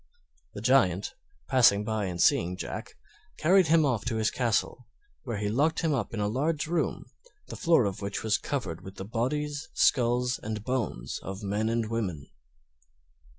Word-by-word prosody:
The - - -6
Giant, - - +3 0.3
passing 120 -6 +5
by 110 -1 -1
and 90 -2 -4
seeing 90 +2 +3
Jack, - - -6 0.4
carried 185 +2 +4
him 160 +1 +5
to 120 -4 0
his 110 -1 +1
castle, 120 0 -1 0.4
where 115 -4 -3
he 105 0 -2
locked 145 +10 +1
him 160 -2 +1
up 120 -7 -2
in 115 - -4
a 105 - +1
large 145 +8 0
room, 165 0 -1 0.4
the - - -6
floor 165 - +3
of 100 0 -3
which 100 0 -4
was 110 -2 +1
covered 115 - -4
with 95 +1 -10
the 95 - -7
bodies, 145 +7 -2
skulls, 125 -1 +2
and 110 -1 -4
bones 115 - -3
of 95 +2 -7
men 105 +2 -1
and 115 -1 0
women. 95 -11 -3
115 Hz, 165 wpm, -28 LUFS, 100-140 Hz, 0.4 s, passing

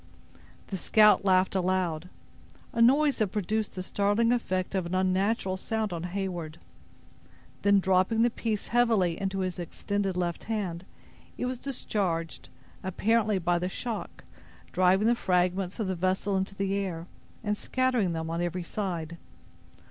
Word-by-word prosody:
The 195 - -3
scout 210 +2 +5
laughed 185 -1 +3
aloud—a 185 +4 -3
noise 280 +4 +5
that 215 - +3
produced 210 +2 -2
the 185 - -3
startling 205 +5 +2
effect 185 -7 -1
of 185 -3 -1
an 180 - -2
unnatural 190 +1 +1
sound 220 0 -2
on 170 0 -4
Heyward; 175 -4 -4 1.0
then 200 0 +5
dropping 190 +4 +3
the 240 - +3
piece, 220 -3 -3
heavily, 225 -8 +2
into 195 0 -1
his 185 0 -3
extended 195 +2 -2
left 175 -2 -2
hand, 185 -6 -3 0.5
it - - -2
was 250 -1 -3
discharged, 190 -11 -3 0.3
apparently 210 +2 +1
by 175 -1 +1
the 180 +1 -2
shock, 230 +3 -5 0.5
driving 185 +3 +3
the 235 - +5
fragments 185 -1 0
of 220 - 0
the 190 - -1
vessel 190 +3 0
into 190 +1 -2
the 195 0 -1
air, 185 -4 -2 0.4
and 210 -1 0
scattering 250 -6 0
them 160 0 -3
on 165 +1 -1
every 175 +1 -2
side. 170 -4 -4
190 Hz, 145 wpm, -28 LUFS, 180-215 Hz, 1.0 s, scout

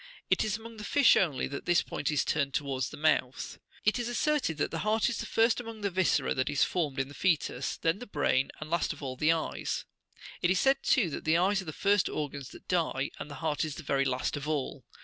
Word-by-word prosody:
It - - +4
is 215 -1 -1
among 225 0 -11
the 210 - -7
fish 280 +4 +5
only 150 -9 +1
that 140 - -6
this 175 -1 +4
point - - -3
is 150 -3 +1
turned 140 -3 0
towards 135 -3 -1
the - - -9
mouth. 145 -4 0 0.3
It 215 +4 +3
is 240 0 -2
asserted 255 - 0
that 145 - -1
the 165 - -3
heart 215 +4 +2
is 240 - -3
the - - -4
first 225 +1 +3
among 230 -2 -7
the 200 -1 -1
viscera 185 0 +2
that 130 +2 0
is 145 -1 +2
formed 150 -7 -1
in 135 - 0
the 140 - -11
foetus, 170 -1 0
then 165 +4 0
the 245 - -8
brain, 135 -8 +1
and 155 - -6
last 170 -2 +1
of 150 - -12
all, 130 -2 -4
the 150 +5 +3
eyes: 165 -1 -2 0.6
it 175 - +2
is 185 - +3
said, 270 0 +3
too, 195 -11 +2
that - - -5
the 160 +1 +3
eyes 195 +3 +2
are - - -10
the 155 - -4
first 200 +4 +2
organs 145 -3 -4
that - - -14
die, 160 -6 0
and - - -6
the 145 - -7
heart 150 -2 0
the 155 +1 -3
very 140 -1 +1
last 130 -1 -1
of 145 0 -5
all. 150 -4 -2
160 Hz, 245 wpm, -30 LUFS, 140-205 Hz, 0.6 s, fish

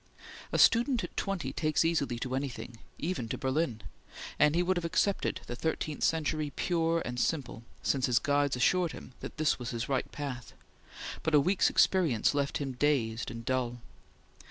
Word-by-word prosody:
A - - 0
student 240 +1 +4
at - - -7
twenty 195 -4 -2
takes 155 0 +1
easily 145 -7 +1
to 125 +2 -4
anything, 130 -3 -4 0.2
even 155 -9 -3
to - - -2
Berlin, 130 -4 -1 0.6
and 150 +1 +5
he 175 - +3
would 185 +1 +1
have 175 - -2
accepted 190 +4 0
the 120 - -5
thirteenth 155 +1 -2
century 155 -1 +1
pure 165 -1 +1
and 125 0 -3
simple 140 -5 -1 0.2
since 135 -2 +1
his 120 -2 +3
guides 145 -2 +2
assured 175 +7 +2
him 130 - -10
that - - -8
this 155 -3 +1
was 120 -2 -4
his 115 -1 -3
right 135 -2 -1
path; 130 -5 -6 0.7
but 160 - +1
a - - +8
week's 185 +7 +3
experience 160 - +3
left 140 0 0
him 140 -2 -3
dazed 125 -4 0
and 115 0 -8
dull. 125 -2 -1
145 Hz, 175 wpm, -30 LUFS, 125-165 Hz, 0.7 s, a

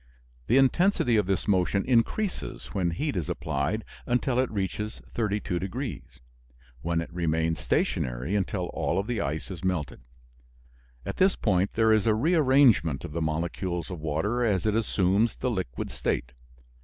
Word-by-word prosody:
The 125 - +4
intensity 135 - +3
of 105 -4 +2
this 95 -2 -1
motion 95 0 +2
increases 135 - -1
when 95 -4 +1
heat 125 - -2
is 85 -5 -2
applied 70 +11 -2 0.2
until 125 +1 +1
it 130 - +1
reaches 105 +1 -3
32 105 -5 -1
degrees, 115 +6 -5 0.6
when 85 0 0
it 85 - -8
remains 80 -2 0
stationary 65 +10 -1
until 95 -2 -1
all 85 - -1
of 100 - 0
the 115 -2 -2
ice 75 +6 -3
is 90 -2 -8
melted. 85 -10 -2 1.0
At - - -4
this 190 +1 +4
point 95 -2 +1
there 110 -1 +4
is 110 0 +2
a 110 - +4
rearrangement 130 - +4
of - - -7
the 85 +2 -3
molecules 85 +2 -2
of 90 - -5
water 80 +11 -1
as 100 -6 +1
it 110 - +2
assumes 105 0 +2
the 125 - -2
liquid 95 - -4
state. - - -2
95 Hz, 155 wpm, -27 LUFS, 85-115 Hz, 1.0 s, The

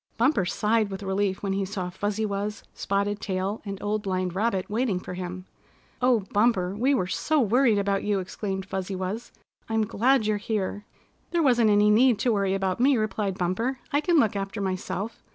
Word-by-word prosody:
Bumper 235 -5 +3
sighed 215 +3 +1
with 195 +1 -6
relief 190 0 -1
when 195 -1 0
he 195 0 0
saw 190 -2 -4
Fuzzy 205 +3 -2
Wuzz, 205 +1 -3
Spotted 200 +1 -1
Tail 190 +2 -2
and 200 -2 -5
Old 210 +1 0
Blind 185 -2 -2
Rabbit 195 -1 0
waiting 215 -3 0
for 180 - -7
him. 180 0 -6 0.6
"Oh, 250 -3 +4
Bumper, 200 -4 +2
we 260 +6 +2
were 185 - 0
so 305 +11 0
worried 240 -1 +3
about 200 0 0
you!" 205 -1 +1
exclaimed 190 +1 -4
Fuzzy 190 0 -4
Wuzz. 190 +6 -4 0.4
"I'm 220 -1 +1
glad 245 +3 +2
you're 215 0 +1
here!" 205 -1 -3 0.4
"There 340 -1 +1
wasn't 240 -5 +4
any 210 0 +5
need 240 +1 +5
to 235 +3 +1
worry 195 -2 +1
about 190 0 -1
me," 265 +1 +4
replied 210 -3 -1
Bumper. 225 +9 -1 0.2
"I 290 - +3
can 345 +1 +2
look 220 -8 +3
after 195 +1 -3
myself. 195 +3 -3
205 Hz, 190 wpm, -26 LUFS, 190-225 Hz, 0.6 s, any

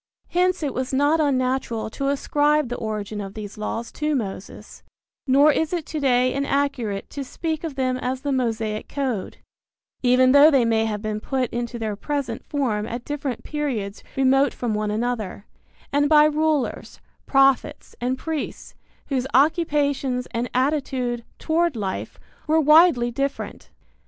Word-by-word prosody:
Hence 360 0 +1
it 280 -4 -1
was 260 +1 -3
not 290 +4 +3
unnatural 255 -6 0
to 275 +3 -3
ascribe 290 0 +1
the 245 - -3
origin 215 -1 -4
of 195 0 -8
these 210 -1 -7
laws 225 +2 -4
to 300 0 -1
Moses, 200 -5 -6 0.5
nor 280 +3 +6
is 315 +3 -1
it 340 -4 -2
to 310 - -4
day 255 -2 +2
inaccurate 275 -7 -1
to 280 - -4
speak 315 +5 -4
of 320 -4 -4
them 255 -1 0
as 255 +1 -3
the 285 - -2
Mosaic 225 -4 -1
code, 260 -8 -3 0.6
even 255 0 +4
though 285 +3 +8
they 270 -6 +3
may 225 -1 +2
have 210 -1 -3
been 215 0 -2
put 255 +1 -2
into 240 0 -3
their 220 -2 -3
present 285 +5 -3
form 225 -7 -1
at 240 +1 -6
different 285 -4 -4
periods 245 -10 -3
remote 270 +1 +3
from 240 -3 -2
one 210 0 -1
another, 215 -2 -3 0.5
and 290 0 +3
by 300 -1 +7
rulers, 305 -2 0 0.3
prophets 275 +2 +2
and 255 +2 0
priests 315 +1 -5 0.4
whose 265 -2 0
occupations 285 -4 +2
and 235 +2 -2
attitude 255 -3 -1
toward 335 -1 +1
life 195 -4 -4 0.3
were 315 +1 +4
widely 305 -5 +5
different. 275 +3 -4
260 Hz, 150 wpm, -23 LUFS, 235-290 Hz, 0.6 s, though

